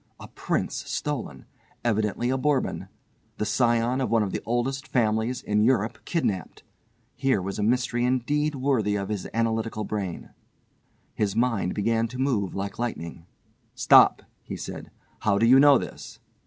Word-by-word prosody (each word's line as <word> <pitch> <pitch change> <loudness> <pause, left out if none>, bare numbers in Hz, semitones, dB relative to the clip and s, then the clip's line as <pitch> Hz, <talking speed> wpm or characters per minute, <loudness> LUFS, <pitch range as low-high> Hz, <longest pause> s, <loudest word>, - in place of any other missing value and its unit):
A - - -10
prince - - -2
stolen! 120 - -4 0.4
Evidently 110 +2 0
a 130 - +1
Bourbon! 145 0 0 0.5
The 105 - -1
scion 120 +3 +1
of 130 - -1
one 115 -2 +3
of 100 - -3
the - - -3
oldest 130 +3 -1
families 115 +1 0
in 105 0 +1
Europe 115 -2 +1
kidnapped. 105 - -2 0.5
Here 135 -5 +1
was 95 +2 -4
a - - 0
mystery 120 +2 +1
indeed 145 +4 0
worthy 130 -7 +1
of 100 -1 -3
his 105 -3 -3
analytical 115 -1 -1
brain. 100 -5 -5 0.8
His 105 -2 -1
mind 115 -6 0
began 115 +2 +1
to 125 +2 -9
move 125 -8 0
like 100 +2 -4
lightning. 85 -8 -5 0.5
"Stop!" - - +6 0.2
he - - -7
said, - - -7 0.3
"how 100 -2 +1
do 115 - +3
you 130 +3 +7
know 140 -1 +7
this?" - - -8
115 Hz, 155 wpm, -25 LUFS, 105-130 Hz, 0.8 s, you